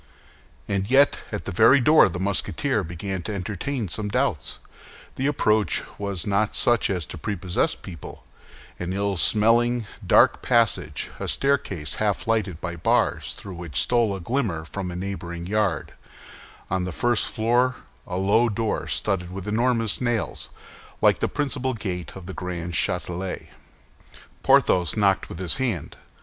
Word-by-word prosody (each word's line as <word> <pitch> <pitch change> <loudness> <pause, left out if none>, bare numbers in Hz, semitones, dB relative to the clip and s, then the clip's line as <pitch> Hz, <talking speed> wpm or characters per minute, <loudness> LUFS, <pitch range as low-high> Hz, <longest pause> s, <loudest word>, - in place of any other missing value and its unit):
And 100 0 -1
yet, 140 +2 +5
at - - -4
the - - -3
very 115 +9 +6
door 150 -2 +6
the 90 - -5
Musketeer 95 0 0
began 90 +3 -4
to 105 - -5
entertain 105 +6 -3
some 105 +4 -3
doubts. 125 - 0 0.6
The 135 - -1
approach 110 - +2 0.2
was 100 -4 -3
not 100 +1 +1
such 120 -2 +3
as 90 -5 -1
to 80 - -8
prepossess 90 -1 -1
people—an 90 0 -10
ill 100 0 0
smelling, 115 +4 +3 0.2
dark - - +5
passage, 95 - +1
a - - -3
staircase 100 - 0
half 105 +4 0
lighted 105 -7 0
by 85 -1 -5
bars 80 - +1
through 95 - -8
which 85 -6 -3
stole 115 - +2
a - - -6
glimmer 95 - -2
from 95 +2 -5
a 90 - -6
neighboring 90 -2 -5
yard; 100 -4 -1 0.7
on 95 0 -1
the 90 - -3
first 120 +6 +1
floor 120 +3 +2 0.3
a 90 - -3
low 105 +5 +3
door 110 0 -2
studded 90 -2 -1
with 95 +1 -7
enormous 115 0 +1
nails, 120 -3 -1 0.5
like - - +4
the - - +1
principal 130 -3 -2
gate 90 -5 -5
of 95 -2 -9
the 95 - -7
Grand 90 -1 -5
Châtelet. 90 +3 -2 0.9
Porthos 90 -1 +3
knocked 100 -2 +2
with - - -7
his 95 +5 0
hand. 120 - -2
100 Hz, 150 wpm, -24 LUFS, 90-115 Hz, 0.9 s, very